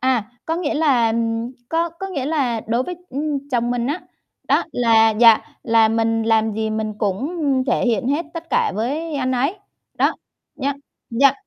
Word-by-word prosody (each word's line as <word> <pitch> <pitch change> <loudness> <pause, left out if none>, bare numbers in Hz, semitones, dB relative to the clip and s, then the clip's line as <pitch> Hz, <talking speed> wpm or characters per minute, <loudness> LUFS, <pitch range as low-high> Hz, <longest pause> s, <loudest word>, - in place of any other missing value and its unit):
À, 255 -4 +1
có 325 - -1
nghĩa 335 -4 -1
là, 270 -7 +3
ừm 230 +1 -1 0.2
có 330 +1 +1
có 340 +4 -7
nghĩa 280 -9 -3
là 270 -7 0
đối 235 +3 +1
với, 360 - -5 0.2
ưm, 285 0 -3
chồng 240 -2 0
mình 245 0 -1
á, 305 +6 -2 0.5
đó - - +3
là, 225 -2 +4
dạ, 225 +1 +6 0.2
là 225 -1 +4
mình 225 0 +1
làm 220 -1 +2
gì 220 0 -1
mình 215 0 -2
cũng 205 +7 -1 0.4
thể - - +1
hiện 235 0 +1
hết 295 +4 0
tất 335 0 -7
cả 460 -2 +2
với 295 +8 -2
anh 260 -2 0
ấy. 275 +9 0 0.4
Đó, - - +2 0.4
nhá 280 0 -1 0.4
dạ, 265 +3 +5
245 Hz, 185 wpm, -21 LUFS, 225-295 Hz, 0.5 s, dạ